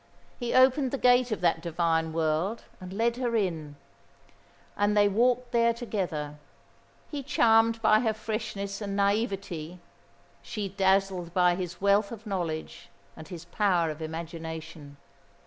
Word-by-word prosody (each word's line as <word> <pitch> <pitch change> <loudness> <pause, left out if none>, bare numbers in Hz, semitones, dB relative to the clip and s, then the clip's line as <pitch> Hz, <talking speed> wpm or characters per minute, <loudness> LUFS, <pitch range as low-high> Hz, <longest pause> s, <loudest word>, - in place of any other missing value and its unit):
He 240 -2 -2
opened 260 +1 +5
the 275 - -2
gate 250 -1 +4
of 215 - -2
that 165 -2 +2
divine 165 -1 0
world 160 +7 -1 0.2
and 185 0 -9
led 230 +4 0
her 245 -2 -1
in, 165 -8 -2 1.0
and 205 +1 +1
they 205 0 +6
walked 240 +4 +1
there 235 -1 +3
together; 175 - -4 0.7
he 290 -2 -3
charmed 225 -3 +3
by 215 0 +5
her 225 -1 +1
freshness 215 -2 -4
and 200 -1 -3
naïveté, 195 -5 -1 0.6
she 205 -3 -4
dazzled 190 -2 +1
by 180 -1 +4
his 175 -1 -5
wealth 200 +1 +3
of 225 -1 -9
knowledge 170 - -4 0.3
and 160 - -11
his 175 -3 -9
power 175 -3 +1
of 155 +1 -9
imagination. 160 -2 -7
195 Hz, 140 wpm, -28 LUFS, 165-225 Hz, 1.0 s, they